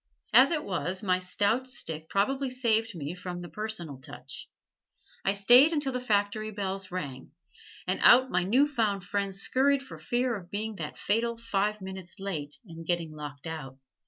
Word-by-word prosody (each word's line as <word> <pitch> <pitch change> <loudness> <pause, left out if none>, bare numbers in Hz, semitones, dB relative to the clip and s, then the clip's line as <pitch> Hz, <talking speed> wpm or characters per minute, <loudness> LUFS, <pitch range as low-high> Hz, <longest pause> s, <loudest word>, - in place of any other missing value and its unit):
As 255 +4 +8
it 315 -3 0
was, 185 +1 -2
my 185 -2 +2
stout 210 +7 +1
stick 160 - -3
probably 265 +7 +1
saved 230 -4 +1
me 150 0 -4
from 180 0 -6
the 175 -1 -7
"personal 180 -10 -5
touch." - - -10 0.7
I 195 - +2
stayed 245 +10 +7
until 290 -3 0
the 250 - -2
factory 215 -2 0
bells 195 -2 -4
rang, 140 -8 -6 0.5
and - - -1
out 260 +1 +7
my - - +2
new 245 +10 +4
found 220 -9 0
friends 195 +1 -2
scurried 275 +4 +2
for 270 - -11
fear 245 0 0
of 180 -4 -9
being 215 +3 -3
the 150 -3 -4
fatal 230 +3 0
five 210 -2 -1
minutes 190 -2 -8
late 155 -7 -4
and 165 -3 -10
getting 170 -1 -1
locked 145 -3 -8
out. 150 -5 -6
200 Hz, 170 wpm, -29 LUFS, 175-235 Hz, 0.7 s, As